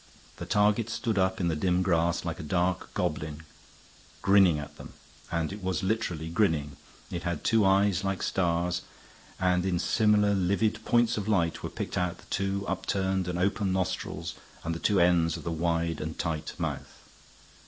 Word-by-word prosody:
The - - -7
target 105 +2 +2
stood 115 -2 -1
up 95 0 +1
in 90 - +1
the 80 - 0
dim 90 +3 +1
grass 85 -1 +1
like 85 -1 -3
a - - -4
dark 90 +3 -1
goblin 75 0 -2 0.8
grinning 95 -5 +5
at 75 0 -8
them, - - -11 0.4
and 85 +1 -1
it 105 - -8
was 95 0 -1
literally 95 -6 -1
grinning. 80 -6 +1 0.4
It 85 - -3
had 85 -3 -3
two 115 -1 +3
eyes 95 -1 +3
like 95 -1 -2
stars, 90 -1 0 0.6
and 90 -1 +2
in 90 -2 0
similar 105 +3 +3
livid 100 +4 +1
points 120 -1 +3
of 105 -1 -3
light 85 -6 +1
were - - -4
picked - - -3
out 90 -1 -1
the - - -17
two 100 +1 -1
upturned 95 -1 -1
and 90 -1 -2
open 100 +2 +1
nostrils 85 -3 -2 0.3
and 85 - -2
the 80 - -5
two 100 +1 +2
ends 85 -2 +3
of - - -9
the 85 - -3
wide 85 0 -1
and 80 +1 -5
tight 80 -3 -3
mouth. - - -5
90 Hz, 175 wpm, -28 LUFS, 85-100 Hz, 0.8 s, grinning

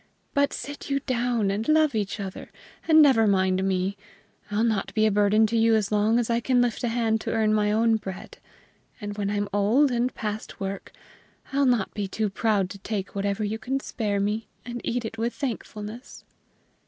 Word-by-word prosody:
But 285 0 +2
sit 285 0 -7
you 275 0 0
down 240 -6 0
and 210 +3 -2
love 310 -2 +4
each 210 -1 -2
other, 195 -2 -7 0.4
and 315 -1 +7
never 235 -6 +5
mind 190 -1 +2
me; 190 +1 0 0.5
I'll 210 +2 0
not 220 -4 0
be 215 0 +3
a 215 - +3
burden 205 +2 +4
to 225 +2 -1
you 225 0 +4
as 210 -2 0
long 215 +2 +3
as 240 -2 +1
I 235 0 +1
can 250 +1 +2
lift 245 -1 0
a - - +1
hand 225 -1 0
to - - -3
earn 220 -1 +2
my 210 -1 +2
own 225 +1 +3
bread. 190 -3 -8 0.6
And 205 -2 -5
when 205 -1 -2
I'm 205 0 -1
old 225 +8 +3
and 245 +1 0
past 215 0 -5
work, 195 0 -5 0.6
I'll 280 0 +3
not 240 -6 +1
be 205 -2 -3
too 210 +1 -2
proud 205 -2 +1
to 200 - -9
take 200 -1 -4
whatever 200 +1 -1
you 215 +2 -2
can 265 +3 -2
spare 210 -6 -2
me, 210 +2 -1 0.2
and 240 -1 -6
eat 240 0 -2
it 225 0 -6
with 235 +1 -1
thankfulness." 230 -3 -6
220 Hz, 200 wpm, -25 LUFS, 205-240 Hz, 0.6 s, and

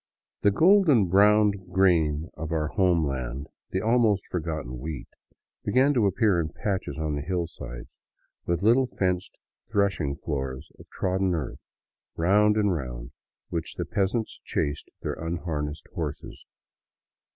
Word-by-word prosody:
The 105 - +5
golden 160 - +5
brown 105 +2 +5 0.2
grain 85 -5 +2
of 80 0 -5
our 75 -2 0
homeland, 70 - 0 0.2
the 95 - -1
al 115 +4 +3
most 105 -4 +2
forgotten 80 -8 -4
wheat, 75 0 -6 0.6
began 135 +3 +3
to 115 -6 +3
appear 100 -1 +2
in 80 -2 -1
patches 95 -6 -3
on 80 -1 -2
the 75 - -2
hillsides, 80 -8 -4 0.6
with 85 +2 0
little 125 +4 +5
fenced 90 -5 -2 0.3
threshing 100 -9 +1
floors 65 -2 -4
of - - -15
trodden 95 -1 0
earth, 75 -6 -5 0.5
round 105 +5 +4
and 105 -3 +3
round 60 -5 -5 0.4
which 85 -2 -4
the - - -3
peasants 105 +3 -1
chased 75 +1 -2
their - - -1
unharnessed 80 -3 -4
horses. - - -6
85 Hz, 130 wpm, -26 LUFS, 75-100 Hz, 0.6 s, The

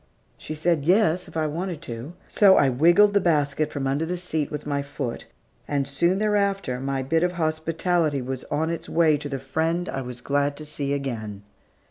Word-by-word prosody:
She 155 - -7
said, 160 -1 +1
yes, 180 -1 +3
if - - -8
I 160 - +1
wanted 170 +2 -3
to. 120 +4 -7
So 195 -2 +5
I 140 - +4
wiggled 175 +11 +5
the 200 - +3
basket 150 -3 +1
from 140 -1 -3
under 140 +4 0
the 180 +2 -2
seat 160 -4 -2
with 150 0 -6
my 145 -1 -1
foot, 140 -4 -5 0.4
and 140 -2 -1
soon 170 +7 +1
thereafter, 200 -9 0
my 135 0 -2
bit 160 +5 +1
of 180 0 +1
hospitality 160 -1 0
was 130 0 -5
on 160 +3 -1
its 170 - -5
way 160 -2 +4
to 145 0 -6
the 135 - -3
friend 160 +6 -1
I 135 - -3
was 125 -1 -7
glad 145 +2 0
to 155 - -8
see 140 -2 -3
again. 110 -8 -4
155 Hz, 195 wpm, -24 LUFS, 140-170 Hz, 0.4 s, So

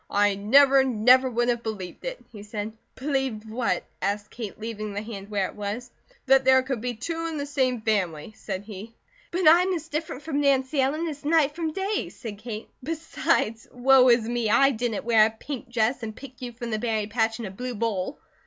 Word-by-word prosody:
"I 205 0 +3
never, 265 +7 +5
never 255 +1 +4
would 240 0 0
have 240 -1 0
believed 210 - -6
it," - - -6
he 210 -3 -10
said. 210 +1 -5 0.2
"Believed 265 -6 -2
what?" 220 -5 -1 0.2
asked 205 +2 -2
Kate, 220 -4 -7
leaving 215 -2 -5
the 205 - -3
hand 205 -3 -8
where 200 -3 0
it - - -11
was. 210 +4 -5 0.3
"That 270 0 +5
there 260 0 +5
could 260 -4 -3
be 245 0 -3
two 330 +8 -3
in 320 -2 -4
the 285 - -2
same 260 -4 0
family," 195 -5 -1
said 195 -2 -5
he. 215 +2 -9 0.3
"But 360 -1 +1
I'm 355 +4 +6
as 325 -1 -6
different 305 -2 -4
from 290 -2 -1
Nancy 275 0 +2
Ellen 300 +5 0
as 295 -2 -6
night 300 -1 +3
from 325 -2 -2
day," 390 +5 -2
said 210 -5 -8
Kate, 215 -1 -6
"besides, 295 -6 -1
woe 255 0 +5
is 235 -2 +4
me, 235 -2 -1
I 275 +5 +5
didn't 230 -4 -2
wear 225 -2 +6
a - - -3
pink 240 +3 -8
dress 240 +2 +1
and 220 -1 -5
pick 260 -1 -12
you 245 -1 -5
from 235 0 -6
the 215 - -1
berry 220 -2 -1
patch 220 +1 0
in 230 - -4
a 190 - -6
blue 250 +5 -5
bowl." 220 +2 -2
240 Hz, 210 wpm, -26 LUFS, 215-275 Hz, 0.3 s, I'm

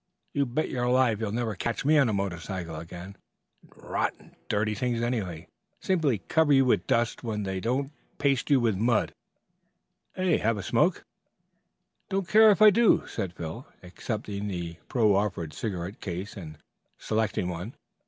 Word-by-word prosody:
you 140 -1 +1
bet 130 +6 -1
your 125 -1 -1
life 125 -4 +3
you'll 110 -2 -2
never 115 -1 -1
catch 115 +7 -3
me 155 +2 +5
on 140 -5 +4
a - - 0
motorcycle 90 -3 -3
again. 85 +4 -9 0.5
They - - -22
are - - -14
rotten - - -2
dirty 105 +1 +1
things 120 +1 -1
anyhow; 110 -9 -2 0.4
simply 150 - 0
cover 160 -2 +3
you 135 -1 +5
with 125 - +2
dust 115 -1 0
when 110 -3 -2
they 95 -1 -3
don't 130 +7 -1 0.3
paste 140 -1 +1
you 140 -2 +5
with 115 -4 +1
mud. 115 +3 +1 1.0
Have 155 - +1
a 100 - -5
smoke?" - - +1 1.1
"Don't 195 -2 -1
care 220 +2 +7
if 210 +1 +5
I 215 - +10
do," 230 +2 +4
said 90 -3 -4
Phil, 90 - -7 0.2
accepting 105 +2 -5
the 85 -4 -5
proffered 100 -8 +1
cigarette 95 +3 -5
case 95 +2 -5
and 80 -6 -9 0.4
selecting 110 -4 -1
one. 90 +6 -5
110 Hz, 160 wpm, -27 LUFS, 95-130 Hz, 1.1 s, I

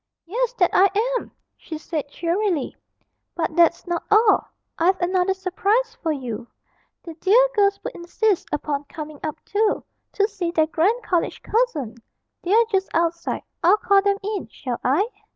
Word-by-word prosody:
'Yes, 475 +7 -1
that 360 -7 +2
I 390 +1 +6 0.3
am!' - - -12 0.3
she 315 - -8
said 305 -2 -4
cheerily, 340 -1 -1 0.6
'but 330 -2 -2
that's 340 0 +4
not 345 -1 -2
all. 425 0 +4 0.3
I've 370 +3 +3
another 365 +1 +1
surprise 415 +5 0
for 325 - 0
you 245 -5 -5 0.6
the 335 - -8
dear 475 +6 +5
girls 400 -1 +2
would - - -5
insist 375 +3 0
upon 290 -1 -2
coming 305 0 -8
up 310 - -4
too, 420 +1 +1 0.3
to 405 - +2
see 390 -5 -3
their 320 -2 +2
grand 385 +10 +1
college 355 -5 -1
cousin; 325 - 0 0.4
they're 435 +6 +4
just 385 -1 +1
outside. 335 0 0 0.2
I'll 365 +5 +6
call 400 -1 +4
them 400 0 +1
in, 410 -1 -3
shall 250 -3 -5
I?' 305 - +2
365 Hz, 155 wpm, -23 LUFS, 325-415 Hz, 0.6 s, I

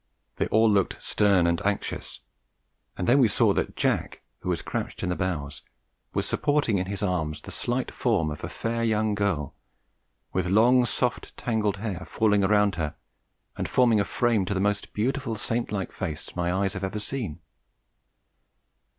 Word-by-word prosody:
They - - 0
all 110 +1 +4
looked 100 -3 +2
stern 100 -4 +3
and 85 -1 +1
anxious; 100 0 -3 0.8
and 90 - -2
then 130 +4 +5
we 125 - +6
saw 100 - +3
that - - -2
Jack, - - -1 0.2
who - - -5
was 85 -4 -1
crouched - - -4
in 90 - 0
the 90 - 0
bows, 75 -7 -3 0.5
was - - -1
supporting 145 -9 +1
in 90 - -2
his 100 +1 -3
arms 80 -6 -1
the - - -10
slight 125 +1 -2
form 100 -11 +1
of 75 - -7
a - - -3
fair 115 0 -2
young 110 -1 +1
girl, 100 -9 -1 0.8
with 90 -1 0
long, 120 +5 +5
soft, 125 +1 -1
tangled 105 -4 0
hair 95 -3 -4
falling 105 -2 +2
around 105 -1 +3
her 75 -2 -3 0.6
and - - -3
forming 120 -4 +4
a - - +3
frame 115 0 +1
to 100 - -2
the - - 0
most 105 +1 0
beautiful 125 +2 -1
saint 115 +3 -2
like 100 -3 -2
face 75 -1 -5
my 90 0 0
eyes 95 +1 0
had 95 -1 -5
ever 95 +2 -2
seen. 105 - -4
100 Hz, 175 wpm, -26 LUFS, 90-115 Hz, 0.8 s, we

